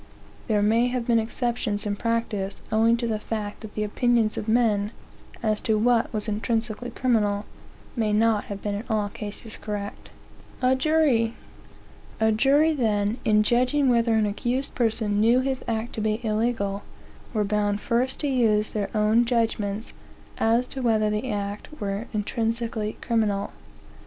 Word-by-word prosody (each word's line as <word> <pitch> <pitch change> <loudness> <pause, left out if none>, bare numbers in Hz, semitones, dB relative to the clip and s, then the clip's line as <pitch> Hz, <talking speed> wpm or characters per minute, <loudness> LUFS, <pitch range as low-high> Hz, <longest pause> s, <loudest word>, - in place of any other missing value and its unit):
There 210 -3 +2
may 230 +3 +3
have 250 -1 -2
been 235 -1 +3
exceptions 225 -2 -2
in 205 -1 -1
practice, 215 -3 -2
owing 225 +2 +4
to 235 - -2
the 220 -2 -1
fact 210 -1 -5
that 220 -2 -10
the 215 - -1
opinions 225 +1 +1
of 210 - -4
men, 220 -3 +2 0.5
as 215 -1 +1
to 220 -1 +1
what 235 +1 +2
was 215 0 -3
intrinsically. 225 +2 -2
criminal, 215 -5 +1 0.5
may 220 -3 0
not 215 0 +2
have 200 -1 -7
been 205 - -1
in 205 +2 -3
all 210 -2 0
cases 210 +2 -6
correct.) 205 -1 -6 0.5
A 255 0 +3
jury, 260 -6 +2 0.8
then, 225 -2 +2
in 210 -1 +4
judging 255 +5 +2
whether 235 -2 +3
an 220 -1 +3
accused 240 +6 -2
person 220 -3 0
knew 235 +3 +5
his 265 0 -2
act 225 0 -2
to 220 - -3
be 215 0 0
illegal, 215 -2 0 0.5
were 215 -3 +1
bound 205 0 0
first 245 +4 0
to 295 - 0
use 220 -5 +2
their 205 -2 -2
own 215 +3 +4
judgments, 225 -3 -1 0.5
as 230 +2 +3
to 265 - -5
whether 220 -3 +2
the 210 +5 -2
act 205 -1 -3
were 205 +3 -3
intrinsically 225 0 -2
criminal. 210 -4 0
220 Hz, 150 wpm, -25 LUFS, 210-240 Hz, 0.8 s, knew